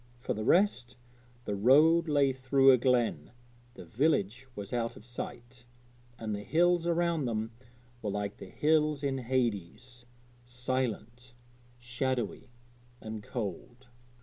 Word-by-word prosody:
For - - -2
the 110 - -4
rest, 130 - +2 0.5
the 105 - -2
road 155 +10 +5
lay 140 -3 +3
through 135 +1 +4
a 130 - +6
glen, 120 - 0 0.4
the - - -10
village 125 -2 0
was 100 +1 -7
out 115 -1 -1
of 105 - -14
sight, 120 0 -9 0.5
and 110 -2 -4
the 100 - -4
hills 170 - +2
around 170 -3 +1
them 110 -1 -2 0.5
were 105 - -3
like 100 0 -3
the - - -10
hills 150 -1 +1
in 135 -1 -1
Hades 120 0 -3 0.4
silent, 125 -1 -4 0.4
shadowy 120 0 -3 0.5
and 110 -1 -7
cold. 120 +4 -6
125 Hz, 125 wpm, -30 LUFS, 115-135 Hz, 0.5 s, a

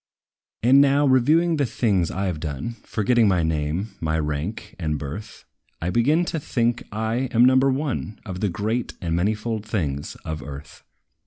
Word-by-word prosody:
And 130 +4 +7
now, 140 +1 +4
reviewing 155 +6 +4
the 140 - +2
things 100 -8 +1
I 95 +1 -1
've 80 - -6
done, 75 - -4
Forgetting 115 +1 +2
my 90 -4 +2
name, 80 +5 -1
my 80 -1 0
rank 80 +8 -3
and 75 -3 -1
birth, 75 +10 -7 0.3
I 85 +2 -2
begin 150 - +3
to 165 - -2
think 120 -4 0
I 110 +4 -1
am 120 +1 +5
number 130 +1 +5
one 130 -6 -2
Of 95 -3 -5
the 105 - 0
great 110 +6 -2
and 85 -2 -1
manifold 105 +4 -1
things 75 -10 -3
of 80 -2 -4
earth. 70 0 -10
105 Hz, 165 wpm, -23 LUFS, 80-125 Hz, 0.3 s, And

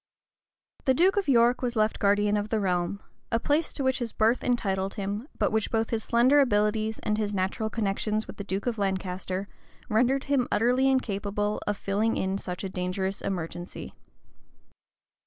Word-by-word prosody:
The 260 -2 +4
duke 365 +6 +4
of 405 -1 0
York 240 -2 +4
was 245 -1 -1
left 215 0 +1
guardian 205 0 +3
of 205 0 -1
the 220 - +1
realm; 180 0 -1 0.3
a 230 - +2
place 300 +5 +1
to 280 - -3
which 260 0 +1
his 235 -2 -3
birth 225 +3 +2
entitled 195 -6 0
him, 205 +5 -4
but - - +1
which 220 -1 0
both 225 0 0
his 225 -2 -1
slender 250 +5 +4
abilities, 215 -3 +2
and 215 0 0
his 210 -1 -1
natural 190 +3 -1
connections 215 0 -1
with - - -10
the 200 - -5
duke 195 0 -3
of 235 -3 -1
Lancaster, 190 0 -2 0.4
rendered 255 +5 +2
him 275 -4 +1
utterly 250 +4 +3
incapable 205 -4 -1
of 205 -1 0
filling 210 +4 0
in 190 +1 -1
such 180 -1 -5
a 195 - -3
dangerous 185 +1 -2
emergency. 175 -1 -5
215 Hz, 175 wpm, -27 LUFS, 195-240 Hz, 0.4 s, The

